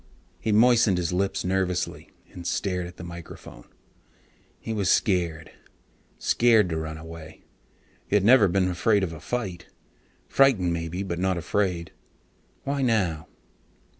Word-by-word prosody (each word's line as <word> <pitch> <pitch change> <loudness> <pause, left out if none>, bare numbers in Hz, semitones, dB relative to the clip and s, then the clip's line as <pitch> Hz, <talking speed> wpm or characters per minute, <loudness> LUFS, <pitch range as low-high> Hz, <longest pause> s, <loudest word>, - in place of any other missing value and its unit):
He 110 - -1
moistened 115 -3 +4
his 90 -1 -1
lips 95 +1 -1
nervously 90 -1 -2 0.2
and 90 -1 -8
stared 90 -1 -2
at 90 - -13
the - - -9
microphone. 85 -8 -10 0.9
He 115 - -5
was 100 -4 0
scared. 85 -5 +1 0.7
Scared 115 -5 +3
to 80 - -2
run 80 0 -5
away. 80 0 -11 0.6
He - - 0
had 100 -1 +3
never 115 -3 +7
been 95 +1 +1
afraid 95 +3 +2
of 85 -3 -3
a 80 - -9
fight, 95 -5 -4 0.6
frightened 110 -11 +3
maybe, 85 +3 -3
but 85 -3 -4
not 95 0 0
afraid. 90 -1 -1 0.7
Why 140 0 -2
now? 100 - 0
90 Hz, 135 wpm, -25 LUFS, 85-105 Hz, 0.9 s, never